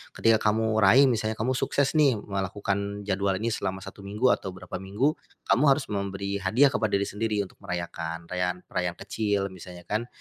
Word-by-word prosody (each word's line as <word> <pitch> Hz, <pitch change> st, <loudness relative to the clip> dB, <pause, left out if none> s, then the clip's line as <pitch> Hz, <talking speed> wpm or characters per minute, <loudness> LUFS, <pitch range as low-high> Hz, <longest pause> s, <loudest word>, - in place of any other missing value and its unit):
ketika 115 Hz, -1 st, +4 dB
kamu 110 Hz, 0 st, +2 dB
raih 110 Hz, +7 st, +7 dB
misalnya 110 Hz, -4 st, +1 dB
kamu 115 Hz, +4 st, -1 dB
sukses 135 Hz, +2 st, +1 dB
nih 145 Hz, -5 st, +4 dB
melakukan 100 Hz, +1 st, -3 dB
jadwal 100 Hz, -1 st, 0 dB
ini 115 Hz, +4 st, -1 dB
selama 95 Hz, -3 st, -3 dB
1 -, -, -10 dB
minggu 105 Hz, +6 st, +1 dB
atau 95 Hz, -1 st, -2 dB
berapa 90 Hz, -1 st, -7 dB
minggu, 105 Hz, +10 st, +1 dB, 0.3 s
kamu 130 Hz, -, +3 dB
harus 135 Hz, -3 st, +2 dB
memberi 100 Hz, 0 st, -2 dB
hadiah 120 Hz, +10 st, +4 dB
kepada 110 Hz, -6 st, 0 dB
diri 100 Hz, -, +2 dB
sendiri 105 Hz, 0 st, -1 dB
untuk 95 Hz, -, -14 dB
merayakan, 85 Hz, -1 st, -5 dB
rayaan 90 Hz, 0 st, -1 dB
rayaan 90 Hz, -1 st, -1 dB
kecil 100 Hz, -1 st, -1 dB
misalnya 90 Hz, -1 st, -11 dB
kan, 110 Hz, +5 st, -2 dB
100 Hz, 175 wpm, -27 LUFS, 95-110 Hz, 0.3 s, raih